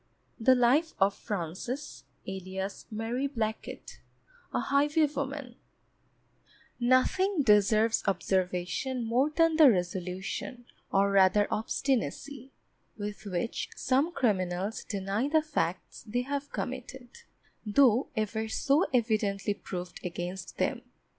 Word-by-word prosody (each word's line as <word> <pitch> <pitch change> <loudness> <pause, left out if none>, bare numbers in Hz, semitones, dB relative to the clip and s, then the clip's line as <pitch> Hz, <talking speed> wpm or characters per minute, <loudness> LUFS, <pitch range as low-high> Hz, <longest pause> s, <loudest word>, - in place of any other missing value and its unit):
The 255 +3 +5
Life 260 +7 +3
of 195 +1 +4
FRANCES, 205 - -5 0.2
alias 190 +1 -5
MARY 230 +5 -2
BLACKET, 225 -5 -5 0.5
a - - 0
Highwaywoman 280 -2 0 1.3
Nothing 285 +9 +3
deserves 215 +1 +4
observation 185 +6 -1
more 250 +6 +2
than 325 +1 +2
the 310 -4 +9
resolution, 185 +5 -3 0.3
or 200 +1 +3
rather 195 +1 +5
obstinacy, 270 +3 -2 0.5
with 210 0 -6
which 185 +4 -2
some 275 +6 +1
criminals 195 - -1
deny 200 +4 -2
the 310 +1 +3
facts 185 - -3
they 245 +4 -1
have 285 +2 -4
committed, 255 0 -5 0.5
though 240 +2 +4
ever 220 +1 -1
so 280 +8 +2
evidently 215 -5 +1
proved 180 -3 -7
against 180 +1 -5
them. 235 +7 0
225 Hz, 100 wpm, -29 LUFS, 195-270 Hz, 1.3 s, the